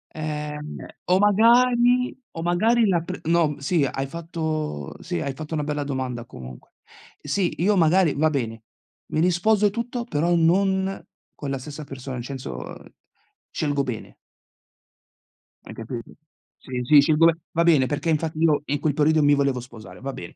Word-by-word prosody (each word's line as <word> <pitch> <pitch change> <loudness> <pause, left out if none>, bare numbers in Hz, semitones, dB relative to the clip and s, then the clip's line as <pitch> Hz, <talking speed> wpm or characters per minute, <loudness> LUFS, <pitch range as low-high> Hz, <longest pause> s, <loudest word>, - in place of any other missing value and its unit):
Ehm, 150 -1 -5 0.3
o 185 +1 +3
magari 240 +4 +4 0.2
o 165 - -6
magari 215 +7 +3
la 175 -3 +2
pr 185 +1 -6
no, 165 -2 +3
m 145 - -6
sì, 145 +2 +1
hai 135 +1 -3
fatto 155 - -4
sì, 85 - -3
hai 135 - -3
fatto 155 +3 -8
una 150 -2 -1
bella 150 -1 -2
domanda 130 -4 -4
comunque. 65 - -11 0.5
Sì, 175 +5 -1
io 205 +3 +3
magari 170 -1 +4
va 155 +3 +2
bene, 115 -6 -3 0.4
mi 155 - -2
risposo 185 +5 +3
e - - +5
tutto, 235 +2 -4
però 170 -2 0
non 190 +3 +2 0.3
con 145 - -6
la 135 - -1
stessa 145 +3 -8
persona, 135 -2 -7
incenso, 120 - -6 0.9
scelgo 145 -2 -1
bene. 125 -4 -6 1.5
Hai - - -9
capito? 115 +1 -7 0.5
Sì, 125 -1 -5
sì 145 +3 +7
scelgo 155 +3 +4
be 165 -1 +5 0.2
va 170 0 +1
bene, 155 -6 +4
perché 145 +5 -2
infatti 155 0 -1
io 155 -3 +3
in 145 0 -1
quel 150 -1 0
periodo 155 +1 +3
mi 145 0 +5
volevo 140 -2 +1
sposare, 110 -7 -12
va 135 0 -4
bene 85 - -9
155 Hz, 165 wpm, -24 LUFS, 135-175 Hz, 1.5 s, sì